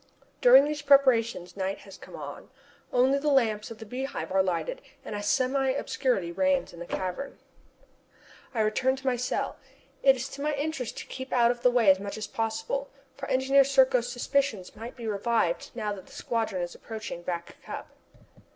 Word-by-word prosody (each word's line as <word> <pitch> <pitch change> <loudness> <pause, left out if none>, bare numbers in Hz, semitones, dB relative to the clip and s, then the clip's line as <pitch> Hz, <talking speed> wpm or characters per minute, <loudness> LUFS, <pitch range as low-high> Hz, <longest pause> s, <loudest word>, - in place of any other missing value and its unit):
During 260 +3 +8
these 300 0 -3
preparations 240 -10 +3
night 195 0 -3
has 195 -2 -12
come - - -12
on. - - -8 0.4
Only 260 +3 +3
the 300 +1 0
lamps 225 -6 +2
of 230 - -8
the 220 - -9
Beehive 255 +2 -4
are 190 0 +4
lighted 190 - -2 0.2
and - - -6
a 205 - -3
semi 265 +5 +1
obscurity 250 -9 -1
reigns 280 +7 +1
in 170 - -11
the 175 - -7
cavern. 185 +9 -4 1.2
I 225 - +2
return 255 +5 +2
to 270 0 -12
my 260 -2 +2
cell. 250 +1 -2 0.4
It 270 -1 +6
is 260 +1 -4
to 280 - -8
my 300 0 0
interest 285 -4 -3
to - - -6
keep 260 0 -7
out 240 -1 +4
of 240 -1 -6
the 250 - +5
way 240 -5 +5
as 190 - +2
much 200 +1 -5
as 215 - -3
possible, 480 - -2 0.3
for - - -6
Engineer 270 +1 +5
Serko's 260 -3 +3
suspicions 245 -6 -1
might 230 +3 -8
be 235 - -8
revived 210 -4 0
now 210 -3 -2
that 190 -2 -10
the - - -16
squadron 220 -6 -2
is 175 - -5
approaching 220 -6 -7
Back 170 -1 -5
Cup. - - -8
245 Hz, 190 wpm, -28 LUFS, 205-270 Hz, 1.2 s, During